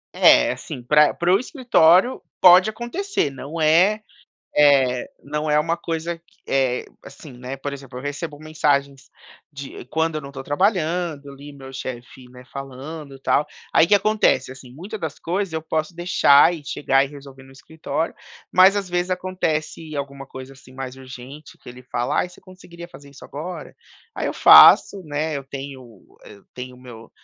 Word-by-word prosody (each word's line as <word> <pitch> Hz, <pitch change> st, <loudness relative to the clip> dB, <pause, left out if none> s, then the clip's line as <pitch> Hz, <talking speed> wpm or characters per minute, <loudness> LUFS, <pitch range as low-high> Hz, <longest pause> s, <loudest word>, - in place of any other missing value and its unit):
É, -, -, +5 dB
assim, 125 Hz, -, -8 dB
pra 150 Hz, +4 st, +4 dB
para 175 Hz, +1 st, 0 dB
o 195 Hz, -, +4 dB
escritório, 245 Hz, -, +3 dB, 0.2 s
pode 185 Hz, +3 st, +7 dB
acontecer 240 Hz, -, -3 dB
não 145 Hz, +5 st, -8 dB
é, 175 Hz, +7 st, +4 dB, 0.6 s
eh, 135 Hz, -4 st, +3 dB, 0.2 s
não 150 Hz, +1 st, -3 dB
é 150 Hz, -, +3 dB
uma 165 Hz, +2 st, 0 dB
coisa 165 Hz, 0 st, -4 dB
que 170 Hz, -, -32 dB
é, 130 Hz, -2 st, 0 dB, 0.2 s
assim, 150 Hz, -, -12 dB
né, 125 Hz, +2 st, -8 dB
por 140 Hz, +1 st, -6 dB
exemplo, 135 Hz, -2 st, -9 dB
eu -, -, -9 dB
recebo 145 Hz, +1 st, -5 dB
mensagens 140 Hz, -3 st, -1 dB, 0.4 s
de 140 Hz, -3 st, -9 dB
quando 160 Hz, +3 st, -1 dB
eu -, -, -3 dB
não 140 Hz, -, -10 dB
estou 135 Hz, -1 st, -9 dB
trabalhando, 165 Hz, -3 st, -1 dB
ali, 140 Hz, +1 st, -12 dB
meu 135 Hz, -1 st, -12 dB
chefe, 130 Hz, -1 st, -8 dB
né, 125 Hz, 0 st, -14 dB
falando 140 Hz, +2 st, -8 dB
e -, -, -18 dB
tal, 145 Hz, -, +1 dB, 0.3 s
aí 165 Hz, -, +5 dB
que 205 Hz, -, +5 dB
acontece, 205 Hz, -11 st, +2 dB
assim, 130 Hz, -1 st, -14 dB
muita 185 Hz, +11 st, -8 dB
das 160 Hz, -7 st, -6 dB
coisas 185 Hz, +1 st, -3 dB
eu 160 Hz, -, -2 dB
posso 160 Hz, +1 st, -3 dB
deixar 175 Hz, -2 st, +4 dB
e 155 Hz, -3 st, -10 dB
chegar 135 Hz, -1 st, +1 dB
e -, -, -7 dB
resolver 140 Hz, -2 st, -13 dB
no 135 Hz, -, -17 dB
escritório, 155 Hz, +3 st, -5 dB, 0.4 s
mas, 190 Hz, +2 st, +6 dB
às 200 Hz, -2 st, -3 dB
vezes, 175 Hz, +1 st, -2 dB
acontece 165 Hz, -4 st, -3 dB
alguma 140 Hz, -1 st, -6 dB
coisa, 130 Hz, +1 st, -10 dB
assim, 135 Hz, -1 st, -18 dB
mais 130 Hz, -1 st, -7 dB
urgente 135 Hz, +3 st, -12 dB
que -, -, -15 dB
ele 125 Hz, +1 st, -12 dB
fala: 120 Hz, -1 st, -2 dB
"Ai -, -, -3 dB
você 180 Hz, -, -18 dB
conseguiria 185 Hz, -2 st, -13 dB
fazer 145 Hz, -5 st, -15 dB
isso 140 Hz, -, -15 dB
agora?", 165 Hz, +6 st, -8 dB, 0.4 s
aí -, -, -3 dB
eu -, -, -2 dB
faço, 195 Hz, -, +7 dB
né, 155 Hz, -1 st, -3 dB
eu 140 Hz, -, -5 dB
tenho 135 Hz, -5 st, -10 dB, 0.2 s
eu 100 Hz, -1 st, -15 dB
tenho 125 Hz, 0 st, -8 dB
o -, -, -18 dB
meu 115 Hz, -3 st, -13 dB
145 Hz, 180 wpm, -21 LUFS, 135-170 Hz, 0.6 s, pode